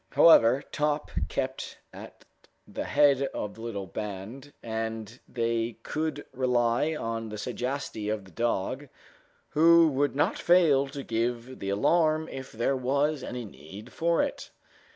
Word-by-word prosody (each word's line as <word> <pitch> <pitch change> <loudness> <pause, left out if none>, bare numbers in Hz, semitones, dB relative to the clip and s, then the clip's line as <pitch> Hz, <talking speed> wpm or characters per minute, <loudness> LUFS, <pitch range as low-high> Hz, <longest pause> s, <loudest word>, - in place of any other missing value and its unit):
However, 130 -4 +6
Top 150 0 -1 0.2
kept 130 0 -4 0.2
at - - -12 0.4
the - - -5
head 140 -2 +4
of 105 - -4
the 115 - -13
little 105 -4 -4
band, 105 - -7
and 110 0 -4
they 115 -1 -1
could 155 -2 -3
rely 125 +3 +1
on 115 -4 -4
the 105 - -6
sagacity 125 -1 -3
of 105 -2 -3
the 95 - -16
dog, 120 - -2 0.6
who 165 +1 +6
would 140 0 0
not 145 - +1
fail 160 -6 +4
to 140 0 -7
give 120 +2 -2
the 100 - -4
alarm 155 - +2
if 130 -1 -7
there 120 +4 0
was 140 +3 0
any 125 -1 -5
need 95 +2 -12
for 170 +1 +2
it. - - -5
125 Hz, 140 wpm, -28 LUFS, 115-145 Hz, 0.6 s, However